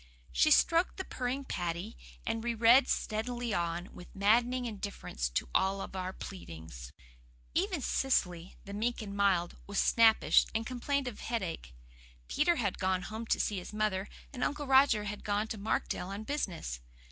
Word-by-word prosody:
She 310 - +4
stroked 335 +3 +4
the 380 - -3
purring 255 +2 -3
Paddy, 170 - -3 0.3
and 225 0 -2
read 235 +2 +5
steadily 235 +1 -2
on, 170 +1 -2
with 180 - -12
maddening 240 +5 +3
indifference 200 - -4
to - - -1
all 195 +1 +2 0.2
our 185 0 -3
pleadings. 80 - -9 0.6
Even 365 -3 0
Cecily, 180 -9 0
the 200 - -8
meek 225 +2 -1
and 200 -1 -7
mild, 190 -4 +2
was 200 0 -5
snappish, 225 -1 +5
and 225 0 0
complained 260 +3 -1
of 240 - -6
headache. 175 - -4 0.5
Peter 340 +4 +2
had 205 - -1
gone 185 -1 +1
home 220 +3 -6
to - - +1
see 205 -3 0
his 180 - -9
mother, 210 -2 -1 0.2
and 250 -2 -3
Uncle 295 0 -1
Roger 265 -5 +5
had 210 0 -5
gone 205 +1 0
to 220 - -4
Markdale 200 -3 -1
on 200 +2 -5
business. 185 - -3
215 Hz, 160 wpm, -32 LUFS, 185-245 Hz, 0.6 s, read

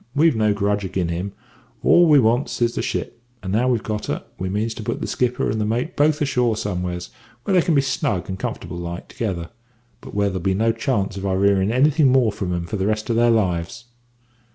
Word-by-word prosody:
We've 155 -1 +4
no 110 -1 +2
grudge 100 0 0
agin 95 -2 -2
him; 90 +4 -3 0.5
all 175 0 +6
we 150 - +7
wants 120 +2 +2
is 120 -1 +1
the - - -2
ship; 120 - -4 0.2
and 95 0 -3
now 120 +4 +2
we've 120 -3 +1
got 105 -1 -3
her, - - -3 0.2
we 95 - -2
means 110 +4 -1
to 110 - -8
put - - -3
the - - -3
skipper 125 0 0
and 110 +1 -1
the - - +1
mate 120 +9 -2
both 150 +1 +3
ashore 125 -5 +1
somewheres 90 -3 -3 0.3
where 195 - -1
they 180 - +5
can 165 -1 +1
be 140 - +5
snug 115 -9 -1
and 95 0 -5
comfortable 85 - -5
like 85 +1 -6
together, 95 -10 -4 0.5
but - - -11
where 100 -1 +2
there'll 95 -2 -4
be 95 +1 +1
no 115 +3 +2
chance 110 -4 -1
of 95 - -5
our 95 0 0
hearin' 100 0 +3
anything 140 +2 +4
more 125 -4 +4
from 100 -3 -4
'em 85 -1 -2
for 105 - -4
the 95 +1 0
rest 110 +2 -1
of - - +1
their 120 +1 +4
lives.' 100 0 0
110 Hz, 230 wpm, -22 LUFS, 95-125 Hz, 0.5 s, we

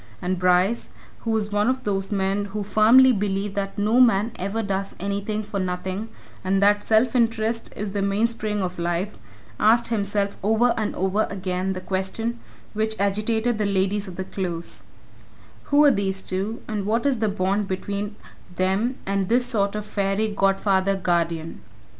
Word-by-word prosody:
And 180 +5 -2
Bryce, 180 +5 +2 0.3
who 230 - -5
was 215 -2 0
one 205 +3 +2
of 260 0 -1
those 195 -1 -2
men 195 0 0
who 205 +1 -4
firmly 225 +6 +6
believe 200 -2 -1
that 195 -1 -3
no 215 +4 +2
man 230 -3 +4
ever 200 +4 -2
does 195 -1 -3
anything 200 +2 -2
for 200 -1 -4
nothing 185 +3 -3 0.3
and 190 +1 +1
that 205 +1 +3
self 225 +4 +3
interest 230 -1 0
is 210 -1 -4
the 200 0 -2
mainspring 210 0 0
of 180 -1 -4
Life, 175 +4 -2 0.4
asked 230 +2 +4
himself 200 -2 -1
over 220 +4 +3
and 215 -2 -2
over 190 +3 +1
again 185 -1 -2
the 185 - -6
question 190 +6 -2 0.3
which 220 0 -1
agitated 215 +3 0
the 210 - +1
ladies 200 +1 0
of 180 - -8
the 190 - -3
Close: 175 -3 -4 0.8
Who 290 +1 +5
are 285 - +7
these 195 -4 -1
two, 195 +5 -3
and 205 -2 -3
what 230 +4 +1
is 270 -5 +2
the 220 -1 +1
bond 200 +1 0
between 200 +2 -3 0.4
them 195 +8 0
and 195 -1 -1
this 245 +2 +3
sort 210 -5 0
of 210 0 -4
fairy 205 +1 0
godfather 195 -1 +2
guardian? 170 -3 -1
200 Hz, 165 wpm, -24 LUFS, 190-220 Hz, 0.8 s, are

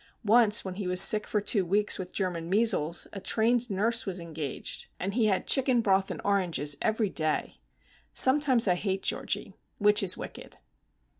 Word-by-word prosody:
Once 220 -1 +3
when 190 - -5
he 190 0 -6
was 180 0 +1
sick 210 +2 +5
for 210 - -1
two 205 -1 0
weeks 205 +4 0
with 185 -1 -7
German 175 -4 -3
measles 190 -6 +1
a 195 - -7
trained 235 +4 +1
nurse 220 +4 0
was 190 -2 -5
engaged, 160 -4 -6
and 195 +2 -4
he 225 -1 +1
had 195 -3 -1
chicken 260 -3 +2
broth 195 -3 +1
and - - -6
oranges 170 -8 0
every 220 -2 -1
day. 155 -1 -2 0.5
Sometimes 260 -4 +4
I 180 - +3
hate 190 +1 -3
Georgie!—which 210 0 -1
is 190 -2 -1
wicked. - - -10
200 Hz, 165 wpm, -27 LUFS, 180-220 Hz, 0.5 s, sick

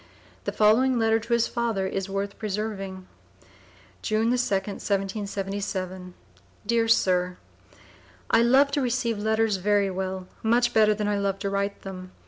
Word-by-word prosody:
The - - -1
following 240 +5 +4
letter 225 0 +3
to 230 +2 -3
his 235 -1 +3
father 230 -5 -1
is 195 0 -3
worth 200 +1 -3
preserving: 195 -3 -4 0.2
BRAINTREE, - - -29 0.5
June 220 +1 +1
the - - +3
2d, 200 -5 -1
1777. 195 -2 -3 0.5
DEAR 230 -1 +2
SIR, 180 -4 +2 0.9
I - - +5
love 265 +4 +5
to 285 - 0
receive 235 -3 0
letters 220 -1 +1
very 200 +1 +2
well, 185 0 -4
much 240 +2 +2
better 215 -1 +4
than 210 0 -2
I 205 -1 0
love 200 -1 -1
to 195 0 -3
write 200 0 -2
them. 185 -1 -8
205 Hz, 150 wpm, -26 LUFS, 195-225 Hz, 0.9 s, I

